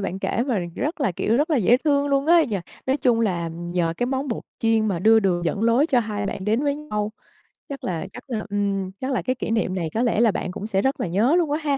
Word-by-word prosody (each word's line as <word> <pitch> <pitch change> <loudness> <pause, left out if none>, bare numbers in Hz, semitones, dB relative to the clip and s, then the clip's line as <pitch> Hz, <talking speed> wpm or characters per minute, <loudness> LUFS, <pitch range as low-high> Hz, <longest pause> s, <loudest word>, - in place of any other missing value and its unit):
bạn 195 -1 -3
kể 235 - -1
mà 235 -7 +1 0.2
rất 305 +3 -3
là, 245 -10 +1
kiểu, 220 +6 0
rất 300 +4 +1
là 300 - +3
dễ 240 +2 +4
thương 285 0 +1
luôn 275 +1 +1
á 340 0 +6
nhỉ. 215 -5 -2 0.3
Nói 265 +2 +2
chung 245 -4 +2
là 175 -6 0
nhờ 170 0 -2
cái 245 - 0
món 265 +1 -2
bột 230 - -3 0.2
chiên 225 -1 +2
mà 185 -5 0
đưa 220 +4 +5
đường 175 -3 0
dẫn 200 +6 -1
lối 235 +6 +4
cho 260 -6 +3
hai 210 -2 -3
bạn 190 -1 -4
đến 220 +6 +1
với 285 -1 +1
nhau. 215 -8 -3 0.6
Chắc 275 - -7
là 175 0 -3
chắc - - -9
là 225 -4 -2
ừm, 200 -2 -1
chắc 265 +1 -3
là 255 - 0
cái 255 0 -1
kỷ 230 - -4
niệm 220 -5 0
này 170 -4 -2
có 225 - 0
lẽ 235 -3 +1
là 230 -3 +5
bạn 185 - -3
cũng 205 +3 -6
sẽ 195 -3 +1
rất 265 +1 0
là - - -1
nhớ 220 - +2
luôn 325 -5 +1
quá 300 - +1
ha. 285 -2 +1
225 Hz, 280 wpm, -23 LUFS, 195-270 Hz, 0.6 s, á